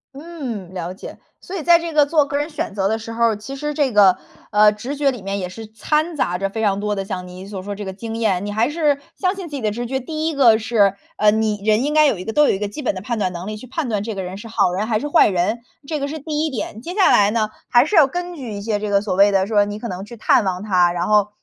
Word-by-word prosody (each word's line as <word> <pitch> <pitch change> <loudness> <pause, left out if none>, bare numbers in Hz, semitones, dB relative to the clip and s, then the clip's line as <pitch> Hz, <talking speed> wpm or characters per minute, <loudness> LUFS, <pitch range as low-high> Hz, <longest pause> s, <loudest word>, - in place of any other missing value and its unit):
嗯， 270 - -7
了 180 0 -4
解。 190 - -10 0.2
所 375 - -8
以 345 - -4
在 340 +1 +6
这 335 -1 -5
个 300 -1 +5
做 295 0 +3
个 280 - -5
人 295 +3 -2
选 300 - -4
择 195 -1 +1
的 220 +1 -1
时 225 +1 -7
候， 230 -1 +2
其 270 +6 -8
实 295 +2 -3
这 280 -4 0
个， 195 -3 +6 0.3
呃， 210 0 +6
直 265 +7 -6
觉 285 -1 +2
里 245 -5 -4
面 195 +1 -3
也 180 - -3
是 220 +5 -9
掺 300 +9 -1
杂 180 -9 0
着 195 +1 -2
非 220 +2 -4
常 200 -2 +1
多 210 0 -1
的 195 -1 -3
像 180 -1 -5
你 185 +2 -10
所 195 -2 -7
说 205 +1 -5
这 205 0 -7
个 190 - -5
经 225 +3 -6
验， 200 -4 0
你 205 - -4
还 220 +5 +1
是 295 -3 +1 0.2
相 370 -1 0
信 375 -3 -7
自 295 - -7
己 270 - -4
的 215 - 0
直 240 +3 -4
觉。 265 +2 -2
第 310 +4 -3
1 320 - -2
个 235 -5 +6
是， 215 -3 +2 0.2
呃， 210 0 +4
你 215 -1 -1
人 215 +2 +3
应 295 - -1
该 305 0 +5
有 250 - +1
一 185 - -7
个 220 - -4
都 300 - +5
有 - - +4
一 195 - -2
个 205 - -2
基 205 +9 -7
本 260 - 0
的 185 - -6
判 230 +2 -3
断 185 -3 0
能 175 +2 -7
力 215 - -4
去 215 +4 -10
判 280 +2 -3
断 210 -3 -1
这 220 +1 -4
个 195 - -4
人 185 +1 -6
是 225 +2 -10
好 180 -5 +1
人 205 +4 -1
还 215 -2 0
是 295 - -4
坏 295 - +5
人， 195 +5 0 0.3
这 305 -3 -3
个 280 - -2
是 315 - -5
第 300 +1 -2
1 315 - -1
点。 225 -3 -5
接 345 +8 -6
下 390 -1 +4
来 205 0 +5
呢， 215 -1 0 0.2
还 245 +3 +5
是 420 - -1
要 315 -4 +8
根 355 +5 -5
据 255 -7 -7
一 200 -1 -5
些 210 -1 -1
这 210 0 -3
个 200 -1 +3
所 200 -3 -3
谓 200 +2 +5
的 195 0 +2
说， 210 -2 +3
你 205 +1 -5
可 235 - -5
能 185 -1 -5
去 235 +3 -11
探 225 - +3
望 185 -1 -2
他， 180 -4 +3
然 175 0 -2
后 210 -1 +3
220 Hz, 330 characters per minute, -20 LUFS, 200-285 Hz, 0.3 s, 要